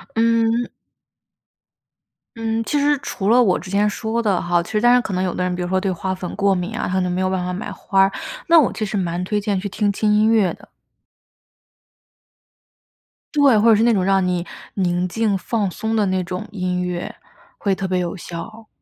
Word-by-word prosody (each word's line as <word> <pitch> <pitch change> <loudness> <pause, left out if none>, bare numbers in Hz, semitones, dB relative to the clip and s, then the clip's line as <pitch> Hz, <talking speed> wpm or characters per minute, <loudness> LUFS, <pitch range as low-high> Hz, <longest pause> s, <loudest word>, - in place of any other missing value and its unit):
嗯 230 +1 +2 1.7
嗯， 225 0 -1
其 295 - 0
实 290 +1 +3
除 195 -6 -3
了 245 +2 +6
我 195 -7 +3
之 185 - -9
前 205 +1 +2
说 220 +2 -2
的 200 -5 +1
哈， 175 0 +1
其 170 - -10
实 215 - 0
当 240 +2 +5
然 250 - +5
可 220 - -6
能 185 0 0
有 185 - -1
的 180 - -2
人 180 0 -1
比 180 - -4
如 - - -3
说 190 +1 0
对 195 0 0
花 185 +1 -3
粉 185 -1 -6
过 200 -1 +2
敏 190 +4 -3
啊， - - -2
他 180 - -3
可 190 - +2
能 180 0 -1
没 180 - -1
有 185 - +1
办 185 -1 -1
法 180 - -3
买 180 +3 -5
花 195 -1 0
儿， 195 - +2 0.3
那 335 -1 +6
我 290 - +2
其 215 - -3
实 210 - -4
蛮 175 -2 -1
推 205 +3 -1
荐 200 -2 -1
去 200 - -4
听 205 +1 0
轻 210 +1 +1
音 215 +1 +4
乐 205 -6 +3
的。 - - -16 2.7
对， 280 -6 +5
或 225 +2 +4
者 225 - +7
是 215 - +2
那 235 0 +4
种 190 -4 +1
让 195 0 +2
你 180 -1 -1 0.3
宁 180 -2 0
静 210 +1 0
放 205 +1 -1
松 220 +5 -3
的 215 -2 +2
那 185 -1 0
种 180 +1 -5
音 180 -3 -2
乐， 180 -1 -4 0.4
会 200 -2 0
特 190 - -3
别 185 -1 0
有 175 0 -3
效。 210 +5 -8
195 Hz, 240 characters per minute, -20 LUFS, 180-225 Hz, 2.7 s, 者